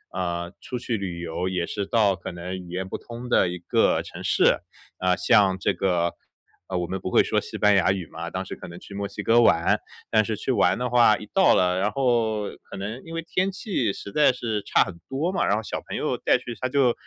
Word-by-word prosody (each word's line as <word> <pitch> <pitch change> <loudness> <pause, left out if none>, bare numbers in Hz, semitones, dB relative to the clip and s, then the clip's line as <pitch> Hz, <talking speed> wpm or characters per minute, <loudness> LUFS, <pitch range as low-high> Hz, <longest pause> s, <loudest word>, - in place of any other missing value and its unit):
嗯， 85 0 -3
出 125 - -5
去 120 -1 -2
旅 95 -5 -4
游 85 +2 -3
也 90 -2 -2
是 100 - -3
到 105 -3 +3
可 90 - -7
能 90 +2 -6
语 90 -1 -10
言 90 +2 -4
不 - - -4
通 120 +1 -9
的 95 -6 +3
一 90 0 -5
个 85 - +2
城 - - -9
市， - - +3 0.4
啊， 90 0 +2
像 95 0 +4
这 - - +1
个， 85 -3 0 0.5
呃， 95 - -2
我 90 -1 -2
们 95 +2 -3
不 - - -3
会 - - +5
说 - - 0
西 - - -7
班 105 0 +4
牙 95 -1 +4
语 95 -3 -3
嘛， 85 +2 -6
当 95 +2 -4
时 - - -6
可 - - -10
能 85 0 -10
去 100 - -12
墨 100 0 -3
西 100 - -7
哥 115 +3 +5
玩。 85 -7 +4 0.3
但 110 -1 +4
是 110 +1 -2
去 130 - -2
玩 95 -6 +3
的 125 - -1
话， 120 -3 +5
一 - - -9
到 190 -1 +5
了， 90 0 +2
然 100 +2 +1
后 115 -4 +1 0.2
可 - - -7
能 105 +6 -5
因 165 - -9
为 165 - -3
天 185 +3 0
气 185 - -1
实 100 - -8
在 150 +5 +5
是 115 -4 -3
差 - - +3
很 90 -4 -9
多 150 +7 -1
嘛， 190 -2 0
然 - - +3
后 110 - -3
小 - - -4
朋 - - -3
友 - - -1
带 - - +3
去 120 - -7
他 130 - 0
就 130 -2 +3
100 Hz, 265 characters per minute, -25 LUFS, 90-120 Hz, 0.5 s, 会